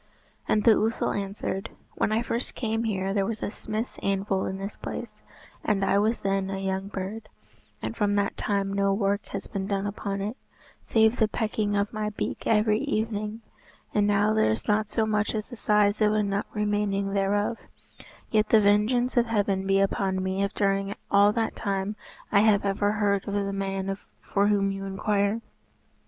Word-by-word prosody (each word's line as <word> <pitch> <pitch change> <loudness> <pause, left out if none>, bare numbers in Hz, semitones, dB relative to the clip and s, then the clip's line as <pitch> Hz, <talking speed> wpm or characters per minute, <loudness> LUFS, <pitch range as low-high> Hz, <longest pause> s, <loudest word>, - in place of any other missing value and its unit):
And 210 - +2
the 230 - +7
ousel 225 +1 0
answered, 195 -1 -3 0.2
"When - - 0
I 225 +2 +1
first 235 +1 -3
came 225 -1 -1
here 195 -3 -1
there 200 -1 +2
was 225 -1 -3
a - - -2
smith's 220 +2 -4
anvil 195 -1 0
in 190 - -3
this 195 +2 -5
place, - - -7 0.4
and 195 -3 +1
I 200 - +3
was 220 +3 +1
then 195 -1 0
a 195 - -3
young 190 0 -2
bird, 205 +3 -5 0.5
and - - -3
from 205 -2 +1
that 200 -1 0
time 200 -1 -1
no 200 0 +2
work 200 0 0
has - - -5
been 195 -1 -4
done 200 -1 -1
upon 200 -1 -3
it, 210 +6 -3 0.4
save 220 +1 +3
the 220 - +4
pecking 210 -1 -1
of 200 +2 0
my 215 -1 -1
beak 210 - -4
every 215 0 +3
evening, 220 -4 -2 0.5
and 205 -1 +3
now 205 +1 +3
there 220 - +3
is 110 - -2
not 210 0 +2
so 220 - +1
much 215 0 0
as 215 -1 -3
the 245 - -8
size 210 -1 +2
of 210 0 +4
a 215 0 +2
nut 200 0 -1
remaining 205 -2 0
thereof; 205 +3 +1 0.7
yet 215 -1 +2
the 220 - +6
vengeance 215 +5 +3
of 240 0 +4
Heaven 200 -3 0
be 195 0 +4
upon 195 -1 +1
me 190 +1 -1
if 200 0 0
during 195 0 +1 0.2
all 200 +1 +6
that 225 -1 -1
time 200 0 -2 0.4
I 200 - +5
have 205 -1 +4
ever 205 +1 +1
heard 200 -2 +1
of 200 - -2
the 200 -1 -1
man 195 0 -2 0.3
for 200 0 +1
whom 200 -1 +2
you 195 0 -5
inquire. 200 +2 0
205 Hz, 190 wpm, -27 LUFS, 195-215 Hz, 0.7 s, the